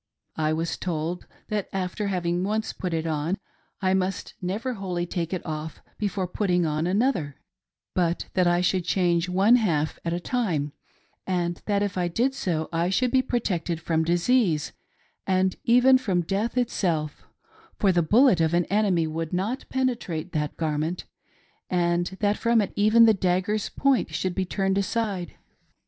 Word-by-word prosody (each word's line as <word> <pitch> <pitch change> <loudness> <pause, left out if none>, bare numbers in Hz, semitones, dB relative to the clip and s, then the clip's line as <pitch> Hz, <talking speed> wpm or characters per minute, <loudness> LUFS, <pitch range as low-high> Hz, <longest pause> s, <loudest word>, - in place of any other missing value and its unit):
I 155 -1 +1
was 165 +1 -1
told 170 0 -3 0.2
that 210 -2 -2
after 190 +2 -2
having 175 -2 -1
once 215 +3 -1
put 180 - -4
it 165 0 -1
on,. 160 +3 -1 0.5
I 185 0 +3
must 190 0 -1
never 210 +8 -2
wholly 180 -5 -3
take 170 -1 -3
it 185 - -3
off 155 -1 -5 0.2
before 200 -3 -1
putting 180 -2 +1
on 155 +2 0
another, 185 - 0 0.5
but 175 -1 0
that 180 -2 +3
I 175 0 +3
should 180 0 +1
change 175 -1 +1
one 195 +7 +5
half 160 -9 0
at 170 - -2
a 170 - -1
time, 175 - -1 0.6
and 175 -2 -1
that 205 -1 +2
if 200 -2 -2
I 175 - +1
did 240 +10 0
so 165 - -2
I 170 +2 +1
should 250 +6 +1
be 260 - +4
protected 185 -10 -2
from 160 0 0
disease 175 -1 +2 0.6
and 185 -1 +2
even 250 +2 +6
from 190 -8 0
death 205 +8 -2
itself; 170 -11 -1 0.5
for 195 - +3
the 175 -1 +3
bullet 215 - +4
of 160 +1 +2
an 175 0 +2
enemy 200 -5 +2
would 160 0 -4
not 205 +9 -2
penetrate 230 -11 -2
that 150 -3 -2
garment, 160 +2 -2 0.6
and 175 -1 +1
that 205 0 +2
from 235 -1 +3
it 205 - -1
even 215 +3 +6
the 220 - +6
dagger's 190 +2 0
point 275 -2 +1
should 185 -1 -1
be 190 +1 -1
turned 195 +1 0
aside. 200 -3 -2
180 Hz, 165 wpm, -25 LUFS, 170-210 Hz, 0.6 s, even